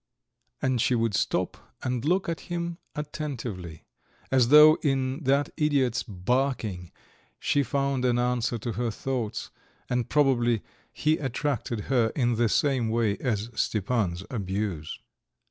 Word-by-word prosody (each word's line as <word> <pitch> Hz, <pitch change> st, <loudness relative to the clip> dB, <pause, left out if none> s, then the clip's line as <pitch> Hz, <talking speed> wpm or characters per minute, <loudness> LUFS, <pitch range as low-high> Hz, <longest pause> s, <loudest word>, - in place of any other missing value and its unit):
And 130 Hz, -3 st, +2 dB
she 125 Hz, -, +2 dB
would 115 Hz, -2 st, +1 dB
stop -, -, -2 dB
and 125 Hz, -2 st, -1 dB
look 185 Hz, +5 st, +1 dB
at 165 Hz, -3 st, -2 dB
him 170 Hz, -1 st, -3 dB, 0.2 s
attentively, 120 Hz, -, -5 dB, 0.5 s
as 130 Hz, -3 st, +4 dB
though 150 Hz, +3 st, +8 dB
in 135 Hz, +1 st, 0 dB
that 140 Hz, +2 st, +2 dB
idiot's 140 Hz, -7 st, +2 dB
barking 105 Hz, -2 st, -2 dB, 0.5 s
she 145 Hz, -, +2 dB
found 140 Hz, -1 st, 0 dB
an 125 Hz, -1 st, +2 dB
answer 120 Hz, -1 st, 0 dB
to 115 Hz, +2 st, -4 dB
her 115 Hz, +3 st, -1 dB
thoughts, 120 Hz, -1 st, -3 dB, 0.4 s
and 125 Hz, -2 st, 0 dB
probably 120 Hz, -6 st, +2 dB, 0.3 s
he 155 Hz, +1 st, +1 dB
attracted 130 Hz, -4 st, -2 dB
her 120 Hz, -1 st, +2 dB
in 120 Hz, -3 st, +2 dB
the 115 Hz, 0 st, +2 dB
same 130 Hz, -4 st, +2 dB
way 110 Hz, -3 st, +1 dB
as 115 Hz, -2 st, -2 dB
Stepan's 100 Hz, -5 st, 0 dB
abuse. 95 Hz, -7 st, -3 dB
125 Hz, 130 wpm, -27 LUFS, 110-140 Hz, 0.5 s, though